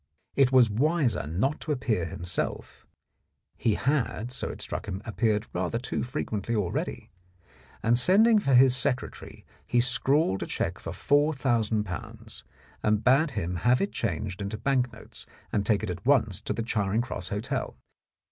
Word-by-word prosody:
It 135 -2 +4
was 130 -3 +6
wiser 140 - +1
not 105 - 0
to 155 - -4
ap 135 -4 -1
pear 110 -10 0
himself 85 +2 -4 0.7
(he 110 -2 +1
had, 125 -4 -1
so 130 - -4
it - - -7
struck - - -4
him, 95 -1 -4
appeared 110 -1 0
rather 90 +5 -1
too 125 - -3
frequently 115 -4 -3
already), 100 -5 -3 0.7
and 120 +2 +3
sending 210 - +5
for 140 -10 +2
his 130 0 +6
secretary 130 -1 -3 0.2
he 120 +1 +2
scrawled 125 -3 +2
a - - -3
cheque - - -2
for - - -7
^4,000, 120 - 0 0.4
and 105 0 +1
bade 140 +5 +4
him 90 -1 -2
have 125 +6 +3
it 200 - -1
changed 100 -2 -3
into 100 +2 -4
bank 130 0 +1
notes - - -13 0.2
and 100 -1 0
take 105 -1 +2
it 105 - -2
at 90 +2 -7
once 115 -8 +2
to - - -3
the 115 - -3
Charing 110 -1 0
Cross 95 -7 -5
Hotel. 105 +2 -3
120 Hz, 160 wpm, -27 LUFS, 105-135 Hz, 0.7 s, was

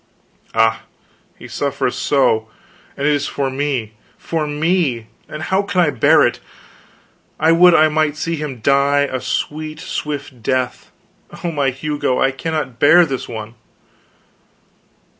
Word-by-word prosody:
Ah, 115 0 +2 0.5
he - - -11
suffereth 140 -3 -2
so; 120 -6 +1 0.5
and 140 - -2
it 150 - +3
is 145 - -1
for 135 -2 -2
me 130 -5 -2 0.2
for 160 -2 -3
me! 150 -5 0 0.2
And 155 +1 -6
how 190 +3 +1
can 200 -2 -2
I 160 -4 +3
bear 125 - +4
it? - - -1 1.0
I 160 - +4
would 175 +1 +6
I 155 - +6
might 155 -1 0
see 165 +1 -2
him 145 -6 -6
die 140 +3 +3
a 130 -3 -2
sweet, 155 +1 -3
swift 145 -6 -5
death; 125 +1 -2 0.5
oh, 170 - -1
my 145 -3 +1
Hugo, 135 0 -2
I 135 - +3
cannot 135 -3 -4
bear 175 +4 +6
this 135 -5 -5
one!" 110 -1 -7
145 Hz, 140 wpm, -18 LUFS, 130-155 Hz, 1.0 s, would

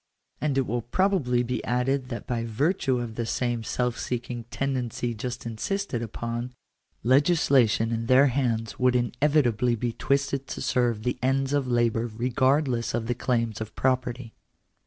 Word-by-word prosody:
And 145 -3 0
it 135 - +2
will 120 +1 -1
probably 125 - +1
be 125 -1 -3
added 125 +2 0
that 120 - -5
by 120 -2 -2
virtue 130 - 0
of 120 -2 -4
this 115 0 -3
same 120 -2 -1
self 125 +1 -1
seeking 120 -1 -4
tendency 125 -2 -2
just 125 +3 -5
insisted 120 - -2
upon, 120 +1 -4 0.5
legislation 130 -5 +3
in 115 0 -2
their 130 +3 +6
hands 120 -4 -1
would 125 0 +3
inevitably 125 -1 +2
be 115 +1 -2
twisted 140 +1 0
to - - -5
serve 120 -4 0
the 125 +1 -1
ends 135 +1 +1
of 140 -2 +1
labour 120 -1 +1
regardless 125 +1 +1
of 115 -1 -2
the 120 - 0
claims 115 -3 -1
of 110 - -6
property. 125 -2 -1
125 Hz, 155 wpm, -26 LUFS, 115-135 Hz, 0.5 s, their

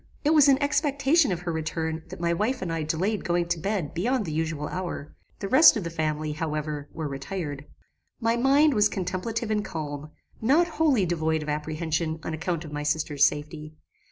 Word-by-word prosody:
It 305 - +4
was 295 -2 +6
in 270 -1 +5
expectation 285 - +2
of 175 -1 -2
her 175 -1 -3
return 160 0 -3
that 185 - -8
my 170 0 +1
wife 215 +6 -1
and 170 -2 -3
I 165 - -2
delayed 180 +8 -1
going 175 0 0
to 175 -1 0
bed 195 -4 -2
beyond 225 +6 0
the 160 - -4
usual 155 -1 -2
hour; 175 -5 -5 0.2
the 200 - -4
rest 265 +5 +7
of 205 - -3
the 170 - -4
family, 155 -1 -2
however, 150 -1 -3
were 160 -2 -4
retired. 145 0 -5 0.5
"My 230 -1 +1
mind 275 +5 +4
was 210 -2 +4
contemplative 215 +5 -3
and 210 -1 +1
calm; 150 -4 -5 0.3
not 285 +10 +4
wholly 310 - +2
devoid 160 -2 0
of 150 - -6
apprehension 155 +1 -2
on 160 - -4
account 170 0 -3
of 150 - -9
my 150 - -3
sister's 150 -1 +2
safety. 150 +1 -6
170 Hz, 190 wpm, -26 LUFS, 155-220 Hz, 0.5 s, rest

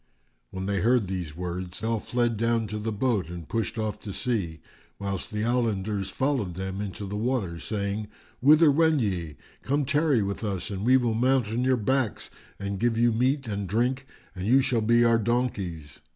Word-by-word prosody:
When 95 0 -5
they 100 0 0
heard 115 +3 +3
these 90 -4 -5
words, 90 +2 -5
all 115 0 0
fled 120 +1 0
down 115 +1 +1
to 105 +1 -3
the 110 +1 -2
boat 105 -5 0
and 85 -2 -7
pushed 115 0 -2
off 105 -1 -2
to 105 - -7
sea; 95 -11 -2 0.4
whilst 100 -2 -4
the 105 0 -2
islanders 105 -5 0
followed 125 - -1
them 95 +1 -4
into 105 0 -5
the 100 +1 -5
water, 105 -7 -1
saying, 105 +1 -3 0.3
"Whither 150 +3 +6
wend 160 -1 +3
ye? 90 -8 -2 0.2
Come, 145 +1 0
tarry 145 -5 +2
with 100 +3 -4
us 100 -2 -3
and 100 0 -4
we 130 +3 +6
will 120 -3 +1
mount 125 0 +2
on 115 +3 -1
your 130 0 +3
backs 130 0 -1 0.3
and 100 -1 -4
give 120 -1 +1
you 120 0 +4
meat 130 +4 +1
and 100 -3 -3
drink, 125 +6 0 0.3
and 95 +1 -4
you 130 +3 +5
shall 125 -4 +1
be 120 +2 +4
our 115 -1 +4
donkeys." 100 - -2
110 Hz, 190 wpm, -27 LUFS, 100-125 Hz, 0.4 s, Whither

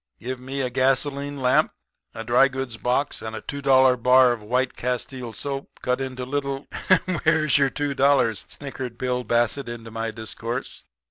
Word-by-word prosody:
Give 130 +1 -5
me 135 +2 -4
a 125 -1 -2
gasoline 135 +2 +1
lamp, 125 - +3 0.4
a 115 - -5
dry 120 +4 +5
goods 130 -3 -5
box, 125 +6 0
and 110 0 -5
a 110 - -6
two 140 +5 -5
dollar 130 -2 +5
bar 125 +1 +5
of 120 -2 -3
white 125 +4 0
castile 125 0 -3
soap, 140 +4 -6
cut 125 +1 0
into 130 -1 -4
little 140 0 -3 0.3
' 185 0 +4
"'Where's 155 -3 +3
your 140 -1 +3
two 145 +1 -2
dollars?' 135 -8 +3
snickered 130 -4 -7
Bill 125 0 -1
Bassett 120 +2 0
into 115 -1 -8
my 115 0 -3
discourse. 115 +3 -6
130 Hz, 175 wpm, -24 LUFS, 120-135 Hz, 0.4 s, dry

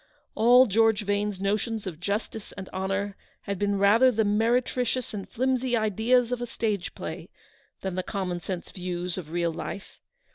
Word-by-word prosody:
All 245 +3 +6
George 220 0 +3
Vane's 205 -1 -1
notions 210 +2 -1
of 170 -5 -6
justice 205 +3 -3
and 190 -1 -8
honour 195 +1 -2 0.3
had 200 -2 -4
been 205 0 +1
rather 215 +6 +6
the 220 -2 +1
meretricious 240 +4 +1
and 200 -2 -6
flimsy 255 0 +1
ideas 225 +3 +2
of 250 -1 -1
a 240 - -3
stage 215 -5 -2
play, - - -6 0.5
than 190 -1 -3
the 185 - -1
common 185 -2 -3
sense 175 0 -5
views 180 -1 -3
of 160 -4 -9
real 170 0 0
life. 200 - -7
205 Hz, 160 wpm, -27 LUFS, 190-230 Hz, 0.5 s, All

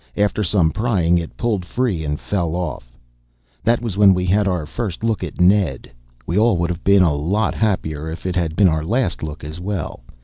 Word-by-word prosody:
After 105 +1 +1
some 90 -4 +2
prying 90 -7 +1
it 85 - -7
pulled 110 -6 -1
free 100 -4 -1
and 75 -1 -3
fell 85 -5 -2
off. 70 -9 -5 0.7
That 115 +1 +2
was 105 -5 -3
when 100 -2 +6
we 90 0 -1
had 100 +3 +2
our 90 -5 -1
first 105 +2 -5
look 115 -4 0
at - - -7
Ned. 90 -7 +2 0.3
We 85 +7 0
all 110 -4 +3
would 85 0 0
have 85 0 -6
been 100 -1 +5
a 80 -4 +3
lot 90 +10 0
happier 80 -8 -1
if 80 +3 -8
it 90 -1 -2
had 85 -3 -1
been 100 0 +5
our 80 -2 +1
last 110 +1 0
look 80 +1 -6
as 75 +3 -7
well. 95 -3 -4
90 Hz, 210 wpm, -20 LUFS, 80-105 Hz, 0.7 s, when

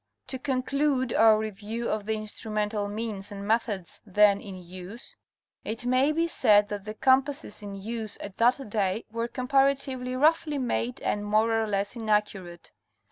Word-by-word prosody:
To 260 -1 -4
conclude 265 0 0
our 220 -1 +6
review 220 +2 -4
of 215 -1 -2
the 220 - +1
instrumental 215 -1 -3
means 205 -1 -5
and 200 0 -6
methods 215 -5 -1
then 205 0 +4
in 195 -2 -8
use, 185 +6 -10 0.5
it 225 +3 -5
may 255 +4 +3
be 330 +2 +1
said 210 -10 +4
that 205 -1 -5
the 215 0 -6
compasses 270 -2 +1
in 200 -1 -7
use 220 +2 -5
at 200 -2 -8
that 250 +3 +3
day 205 0 -1
were 230 +1 -2
comparatively 265 0 +1
roughly 300 +1 +2
made 245 -1 -1
and 205 - -1
more 215 +2 +2
or 225 -1 +1
less 200 +2 -1
inaccurate. 210 -6 -2
220 Hz, 155 wpm, -27 LUFS, 205-255 Hz, 0.5 s, our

